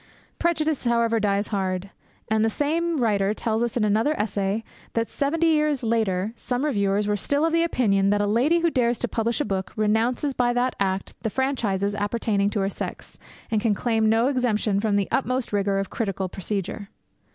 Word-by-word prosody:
Prejudice, 315 Hz, -4 st, 0 dB
however, 235 Hz, -1 st, +2 dB
dies 205 Hz, 0 st, 0 dB
hard; 190 Hz, -1 st, -2 dB, 0.4 s
and 220 Hz, 0 st, +2 dB
the 225 Hz, -, +3 dB
same 325 Hz, +7 st, 0 dB
writer 210 Hz, -4 st, +1 dB
tells 220 Hz, 0 st, -1 dB
us 240 Hz, 0 st, -1 dB
in 230 Hz, -, +1 dB
another 220 Hz, +9 st, +1 dB
essay 205 Hz, +1 st, -1 dB, 0.3 s
that 230 Hz, 0 st, -1 dB
seventy 310 Hz, +4 st, 0 dB
years 300 Hz, -4 st, +2 dB
later, 220 Hz, -3 st, 0 dB
some 250 Hz, +3 st, -2 dB
reviewers 205 Hz, -6 st, +1 dB
were 210 Hz, -, +1 dB
still 285 Hz, +9 st, 0 dB
of 330 Hz, -, 0 dB
opinion 235 Hz, -13 st, +2 dB
that 205 Hz, 0 st, +2 dB
a 205 Hz, -, +2 dB
lady 260 Hz, +11 st, +2 dB
who 335 Hz, -1 st, +2 dB
dares 240 Hz, -3 st, +1 dB
to -, -, -2 dB
publish 230 Hz, +1 st, -1 dB
a 295 Hz, -, 0 dB
book 190 Hz, -1 st, -3 dB
renounces 225 Hz, +6 st, +1 dB
by 245 Hz, -1 st, +1 dB
that 245 Hz, +1 st, 0 dB
act 195 Hz, -1 st, -1 dB
the 220 Hz, -, -1 dB
franchises 210 Hz, -6 st, 0 dB
appertaining 205 Hz, -1 st, 0 dB
to 205 Hz, -1 st, -1 dB
her 195 Hz, -, +1 dB
sex, -, -, -7 dB, 0.3 s
and 215 Hz, -2 st, +1 dB
can 220 Hz, -2 st, +2 dB
claim 220 Hz, 0 st, +1 dB
no 225 Hz, +2 st, +3 dB
exemption 230 Hz, -6 st, +1 dB
from 210 Hz, -1 st, +1 dB
the 200 Hz, -1 st, +1 dB
utmost 255 Hz, -3 st, -1 dB
rigour 200 Hz, -1 st, +1 dB
of 195 Hz, 0 st, -3 dB
critical 195 Hz, -4 st, -2 dB
procedure. 195 Hz, +2 st, -4 dB
220 Hz, 185 wpm, -24 LUFS, 200-255 Hz, 0.4 s, the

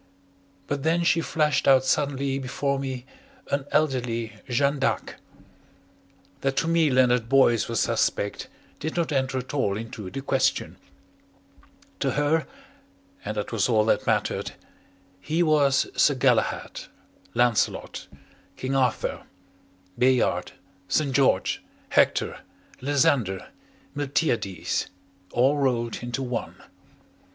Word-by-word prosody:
But 145 Hz, -1 st, -3 dB
then 165 Hz, +3 st, +1 dB
she 170 Hz, 0 st, +3 dB
flashed 150 Hz, -3 st, +1 dB
out 130 Hz, -1 st, +6 dB
suddenly 140 Hz, -1 st, 0 dB
before 140 Hz, +1 st, -2 dB
me 130 Hz, -2 st, -5 dB, 0.5 s
an 140 Hz, -1 st, 0 dB
elderly 125 Hz, -7 st, 0 dB, 0.2 s
Jeanne 140 Hz, +3 st, +1 dB
d'Arc. 140 Hz, -, -1 dB, 1.2 s
That 135 Hz, 0 st, -1 dB
to 165 Hz, -, +1 dB
me 165 Hz, -2 st, +3 dB
Leonard 125 Hz, -3 st, +3 dB
Boyce 120 Hz, -6 st, +4 dB
was -, -, 0 dB
suspect 100 Hz, -, 0 dB, 0.3 s
did 160 Hz, -, -4 dB
not 170 Hz, -2 st, 0 dB
enter 130 Hz, -2 st, 0 dB
at 130 Hz, +2 st, -5 dB
all 105 Hz, -9 st, 0 dB
into 110 Hz, -3 st, -7 dB
the 135 Hz, -, -5 dB
question. 135 Hz, -1 st, 0 dB, 1.2 s
To -, -, 0 dB
her 145 Hz, +2 st, +1 dB, 0.8 s
and 105 Hz, -, -4 dB
that 105 Hz, -, -3 dB
was 115 Hz, 0 st, +1 dB
all 110 Hz, -2 st, +3 dB
that -, -, +1 dB
mattered -, -, 0 dB, 0.7 s
he 160 Hz, -, 0 dB
was 145 Hz, -4 st, +3 dB
Sir -, -, +4 dB
Galahad, -, -, 0 dB, 0.5 s
Lancelot, 120 Hz, -2 st, 0 dB, 0.5 s
King 130 Hz, +1 st, -2 dB
Arthur, 130 Hz, -4 st, 0 dB, 0.8 s
Bayard, 125 Hz, -1 st, +2 dB, 0.3 s
St. 145 Hz, +4 st, +1 dB
George, 130 Hz, -8 st, +2 dB, 0.3 s
Hector, -, -, +2 dB, 0.4 s
Lysander, 130 Hz, -8 st, +1 dB, 0.5 s
Miltiades, 135 Hz, -, -1 dB, 0.4 s
all 135 Hz, +4 st, +3 dB
rolled 120 Hz, -4 st, 0 dB
into 120 Hz, +2 st, -3 dB
one. 125 Hz, -3 st, -4 dB
135 Hz, 115 wpm, -25 LUFS, 120-145 Hz, 1.2 s, out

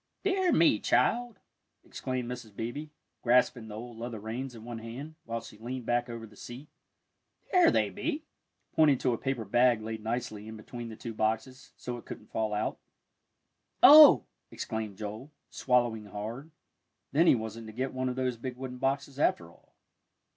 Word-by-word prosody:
"Dear 380 Hz, -2 st, +2 dB
me, 165 Hz, -, +4 dB
child," 240 Hz, -3 st, +1 dB, 0.5 s
exclaimed 130 Hz, -2 st, -4 dB
Mrs. 120 Hz, -4 st, -7 dB
Beebe, 130 Hz, +8 st, -5 dB, 0.3 s
grasping 120 Hz, -1 st, +3 dB
the 105 Hz, -, -8 dB
old 115 Hz, +1 st, -8 dB
leather 115 Hz, -2 st, -5 dB
reins 120 Hz, +4 st, -5 dB
in 110 Hz, -, -11 dB
one 120 Hz, -1 st, -6 dB
hand, 125 Hz, +8 st, -8 dB
while 115 Hz, 0 st, -3 dB
she 105 Hz, -, -13 dB
leaned 125 Hz, +1 st, -5 dB
back 120 Hz, +1 st, 0 dB
over 115 Hz, -1 st, -6 dB
the 105 Hz, -1 st, -16 dB
seat, 125 Hz, +8 st, -10 dB, 0.8 s
"there 360 Hz, -3 st, +6 dB
they -, -, +2 dB
be," 305 Hz, +2 st, -3 dB, 0.5 s
pointing 150 Hz, -4 st, +5 dB
to 125 Hz, -1 st, +1 dB
a -, -, -1 dB
paper 135 Hz, -5 st, -2 dB
bag 120 Hz, +3 st, +4 dB
laid 110 Hz, -1 st, -5 dB
nicely 110 Hz, -2 st, -3 dB
in 110 Hz, 0 st, -8 dB
between 120 Hz, +2 st, -8 dB
the 110 Hz, -, -8 dB
two 115 Hz, +1 st, -7 dB
boxes, 110 Hz, +4 st, -2 dB
so 125 Hz, -1 st, -5 dB
it -, -, -16 dB
couldn't -, -, -10 dB
fall 110 Hz, -1 st, -1 dB
out. 105 Hz, -, -2 dB, 1.0 s
"Oh!" 300 Hz, +1 st, +10 dB, 0.2 s
exclaimed 110 Hz, -4 st, -5 dB
Joel, 110 Hz, +7 st, -7 dB, 0.2 s
swallowing 120 Hz, -4 st, +1 dB
hard. 110 Hz, +9 st, -6 dB, 0.6 s
Then 165 Hz, +4 st, +4 dB
he -, -, +7 dB
wasn't 110 Hz, 0 st, -6 dB
to -, -, -8 dB
get 130 Hz, +4 st, -3 dB
one 130 Hz, 0 st, -1 dB
of 125 Hz, -, -3 dB
those 130 Hz, -2 st, -1 dB
big 125 Hz, +1 st, -6 dB
wooden 125 Hz, -1 st, -6 dB
boxes, 140 Hz, +1 st, -1 dB
after 85 Hz, -, +1 dB
all. -, -, -26 dB
120 Hz, 175 wpm, -30 LUFS, 110-130 Hz, 1.0 s, Oh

